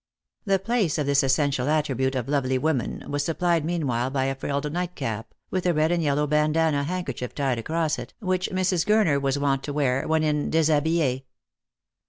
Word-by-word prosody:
The 195 -1 +3
place 195 -5 0
of 150 - 0
this 140 0 +3
essential 135 0 +1
attribute 135 -4 0
of 125 -2 -2
lovely 135 -2 +1
woman 135 -3 -1
■was 145 0 -2
supplied 165 +1 +1
meanwhile 140 -7 -1
by 135 -1 0
a 135 - 0
frilled 140 +2 -3
nightcap, 165 -11 -4 0.2
with 185 -1 -1
a 175 - +2
red 155 +2 +2
and 175 -1 +1
yellow 150 -1 +1
bandannah 150 0 +2
handkerchief 140 -8 -4
tied 135 -5 0
across 160 +5 -1
it, - - -9
which 185 -3 -1
Mrs. 185 -2 +1
Gurner 195 -9 +3
was 135 0 0
wont 140 -1 +1
to 145 - -4
wear 135 -3 0
when 160 0 +2
in 150 -1 0
deshabille. 155 -3 +2
150 Hz, 180 wpm, -25 LUFS, 135-165 Hz, 0.2 s, The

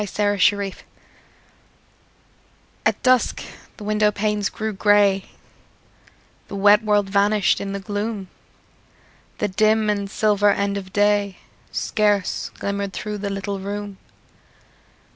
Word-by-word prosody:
FORGIVENESS 205 -1 +1 2.1
At - - -1
dusk 255 -2 +2 0.3
the 215 - -9
window 210 0 +2
panes 210 0 -1
grew 220 -1 -4
grey; 200 -1 +3 1.2
The - - -7
wet 205 +2 +5
world 205 -2 +2
vanished 200 +1 +2
in 200 0 -4
the 200 - -3
gloom; 205 0 -4 1.1
The 210 - 0
dim 215 +2 +2
and 200 -1 -3
silver 205 -1 +2
end 200 0 0
of 190 -2 -6
day 205 -1 +1 0.3
Scarce 205 -3 0
glimmered 200 -1 -3
through 210 +2 -5
the 200 0 -3
little 195 0 -4
room. 200 0 -6
205 Hz, 110 wpm, -22 LUFS, 200-210 Hz, 2.1 s, wet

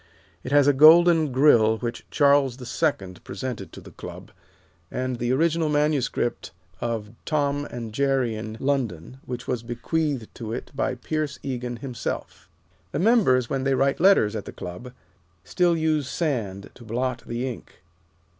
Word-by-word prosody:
It 125 - -6
has 145 -1 +5
a 145 - +6
golden 160 +1 +7
Grill 120 -5 +5
which 120 +1 -5
Charles 140 -3 +3
the 125 - -9
Second 100 - -2
presented 105 0 -6
to - - -10
the - - -13
Club, - - -10 0.6
and 130 -1 -3
the 120 +1 0
original 160 +3 +2
manuscript 145 - 0 0.3
of 115 -3 -3
"Tom 145 -2 0
and 115 -5 -7
Jerry 135 -2 +1
in 110 0 -6
London," 130 - -2
which 125 0 -6
was 125 -3 -1
bequeathed 125 +2 -2
to 115 -2 -6
it - - -6
by 130 -1 -1
Pierce 150 +2 -3
Egan 125 -2 -4
himself. 125 -4 -5 0.4
The - - -3
members, 180 - +3
when 135 +1 -2
they 135 0 +2
write 135 +1 +1
letters 165 - +4
at 105 - -4
the - - -7
Club, 90 +8 -8 0.5
still 175 -2 +1
use 155 -3 0
sand 110 - -3
to 120 - -14
blot 120 +2 -2
the 120 +2 -3
ink. 120 -7 -9
130 Hz, 155 wpm, -24 LUFS, 115-145 Hz, 0.6 s, golden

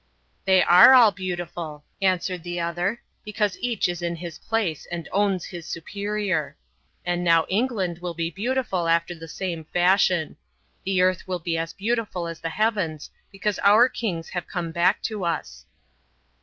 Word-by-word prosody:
"They 190 -1 +5
are 180 +9 +8
all 235 -4 +7
beautiful," 175 -5 -5 0.2
answered 185 -1 0
the 175 +1 -4
other, 175 +6 -2 0.2
"because 210 -2 -1
each 235 -6 0
is 175 -1 -4
in 170 0 -2
his 170 -1 -8
place 215 -9 -2
and 170 -1 -5
owns 195 -3 +1
his 175 -2 -8
superior. 200 -2 -3 0.5
And 175 0 -1
now 165 -2 +4
England 195 -5 -1
will 175 -1 -5
be 165 0 -2
beautiful 205 -3 -1
after 170 +1 +1
the 165 -1 -10
same 170 0 -4
fashion. 180 -1 +2 0.5
The 190 -1 +2
earth 185 0 +1
will 185 -1 -1
be 170 -1 -3
as 165 0 -3
beautiful 210 -4 -2
as 165 -1 -7
the 165 - -3
heavens, 185 -6 -1 0.2
because 200 +1 -2
our 215 +5 +6
kings 180 -10 -4
have 180 -2 -4
come 175 -3 -4
back 175 +4 +2
to 215 -4 -3
us." 170 -4 -4
180 Hz, 160 wpm, -24 LUFS, 170-200 Hz, 0.5 s, are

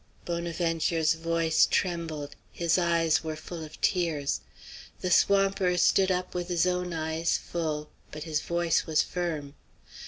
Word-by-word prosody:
Bonaventure's 165 -1 0
voice 165 0 +2
trembled; 165 -5 -2 0.2
his 170 +1 +1
eyes 170 -2 +2
were 160 -1 -3
full 160 +1 -7
of 155 0 -11
tears. 165 -6 0 0.6
The 180 - -1
swamper 195 -2 +3
stood 190 +2 +4
up 180 0 -1
with 175 -1 -3
his 175 -1 +2
own 180 0 -1
eyes 160 0 0
full, 155 -3 -4 0.2
but 150 0 -7
his 155 -3 -1
voice 170 -1 0
was 160 -1 +3
firm. 155 -6 -3
165 Hz, 135 wpm, -28 LUFS, 160-175 Hz, 0.6 s, stood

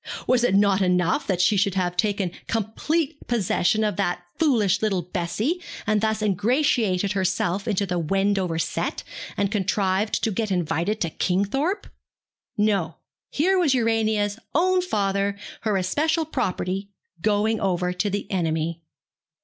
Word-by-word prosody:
Was 250 -1 +3
it 220 -6 +3
not 200 -1 +4
enough 180 - +1
that 190 -3 0
she 185 +4 +4
should 195 -1 +1
have 180 -2 0
taken 200 -2 0 0.2
complete 290 +8 -1
possession 220 -2 +1
of 210 -1 -1
that 175 -3 -1 0.2
foolish 220 - +3
little 195 -5 0
Bessie, 200 - -2 0.2
and 215 -1 +2
thus 220 0 0
ingratiated 210 - +1
herself 190 0 0
into 205 -2 +1
the 180 -2 -1
Wendover 195 0 0
set, 165 - -2 0.3
and 200 0 0
contrived 200 0 0
to 220 - +1
get 215 +2 -1
invited 175 +3 0
to 170 - 0
Kingthorpe? 270 - 0 0.7
No. 200 -6 +1 0.3
Here 370 +6 +2
was 300 -7 +3
Urania's 220 -3 +1 0.2
own 365 +3 +3
father, 200 - 0 0.2
her 215 -3 +1
especial 310 - +1
property, 190 - -2 0.3
going 215 +2 +1
over 180 -2 0
to 205 +3 -1
the 200 +1 -2
enemy. 165 -2 -1
200 Hz, 140 wpm, -24 LUFS, 185-225 Hz, 0.7 s, not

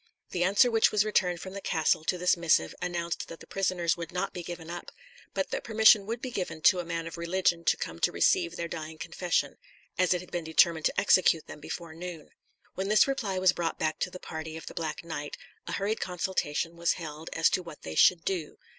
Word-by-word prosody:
The 175 - -2
answer 200 +7 +4
which 225 -1 +4
was 210 0 +3
returned 180 -5 +1
from 190 - -7
the 200 - -6
castle 155 -2 +1
to 180 - 0
this 180 +1 +3
missive 160 - +2
announced 170 -1 -3
that 165 - -10
the - - -12
prisoners 185 -3 0
would 170 +1 -7
not 180 - -2
be 180 - -5
given 170 -1 -7
up; 175 +1 -7 0.5
but - - -1
that - - -2
permission 220 -2 +5
would 230 +2 -4
be 255 - -3
given 180 -6 -4
to 180 - +5
a - - -2
man 165 -1 -3
of 165 +1 -7
religion 170 0 +1
to - - +3
come - - -5
to - - +2
receive 355 -3 +2
their 170 - -3
dying 160 -1 -6
confession, 170 +2 -1 0.4
as 185 -1 +3
it 175 - -2
had 180 - -14
been 175 -1 -2
determined 160 0 +3
to - - -1
execute 185 -5 +4
them - - -10
before 165 +2 -7
noon. 170 -2 -8 0.4
When 190 +1 -3
this 215 - +6
reply 225 -9 -1
was 185 0 +4
brought 170 -2 -2
back 155 -1 -1
to - - -1
the 185 - -9
party 160 -1 -6
of 160 - -9
the - - -8
Black 160 -1 -4
Knight, 145 -3 -5 0.3
a - - -4
hurried 205 +3 -1
consultation 170 -3 -2
was 170 0 +2
held 160 -1 -7
as 165 - +3
to 185 - +1
what 165 -4 -11
they 80 - -6
should 165 - +5
do. 180 -6 -3
175 Hz, 230 wpm, -29 LUFS, 165-190 Hz, 0.5 s, this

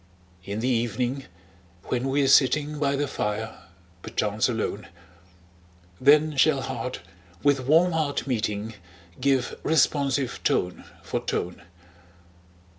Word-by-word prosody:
In 100 +4 -4
the 125 - 0
evening, 120 +2 -1 0.6
when 125 +1 -2
we're 140 0 +2
sitting 145 +3 +3
By 140 -1 +1
the 145 +1 -1
fire, 110 -2 -4 0.4
perchance 105 +5 0
alone, 110 -5 -3 1.1
Then 150 +1 +5
shall 140 0 +4
heart 125 -1 -4 0.4
with 135 -3 +2
warm 165 +5 +5
heart 155 -4 -1
meeting, 110 -3 -2 0.5
Give 135 -1 0
responsive 140 -3 +1
tone 90 0 0 0.2
for - - -2
tone. 90 +1 -3
130 Hz, 110 wpm, -25 LUFS, 115-145 Hz, 1.1 s, Then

